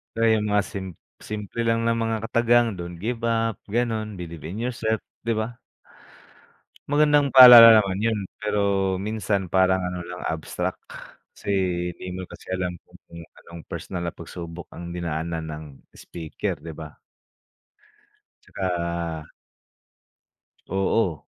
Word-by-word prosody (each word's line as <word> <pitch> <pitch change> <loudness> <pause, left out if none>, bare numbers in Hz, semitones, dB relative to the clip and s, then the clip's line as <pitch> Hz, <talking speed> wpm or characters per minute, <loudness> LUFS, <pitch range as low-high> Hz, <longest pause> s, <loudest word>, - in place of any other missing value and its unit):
Kaya 115 0 +2
yung 105 - -2
mga 105 -1 +3
sim 95 -3 -5 0.4
simple 105 +2 -5
lang 115 0 +2
ng 115 0 +2
mga 115 0 -1
katagang 120 +1 +3
don't 85 0 -7
give 115 +6 -4
up, 115 -1 0
ganon, 110 -2 -1
believe 85 -2 -8
in 95 +6 -6
yourself, 115 -3 -1 0.3
di 115 - +2
ba? 115 +2 -4 1.3
Magandang 145 0 +4
paalala 120 -4 +11
naman 95 -1 -3
yun, 110 0 0 0.2
pero 100 -2 0
minsan 105 -3 -2
parang 95 0 +3
ano 90 0 -3
lang 90 +1 -8
abstract, 80 -1 -3 0.6
kasi, - - -8 0.5
hindi 90 - -8
mo 95 - -5
kasi - - -13
alam 90 -1 -2
kung - - -19 0.4
anong 85 0 -11
personal 90 -2 -5
na 85 - -4
pag-subok 85 0 -8
ang 85 0 -8
dinaanan 85 -1 -3
ng 75 0 -6 0.3
speaker 80 -2 -5
di 80 +2 -8
ba? 75 -1 -10 1.4
Tsaka 85 -3 -3 1.4
Oo. 95 -3 0
95 Hz, 130 wpm, -24 LUFS, 85-115 Hz, 1.4 s, paalala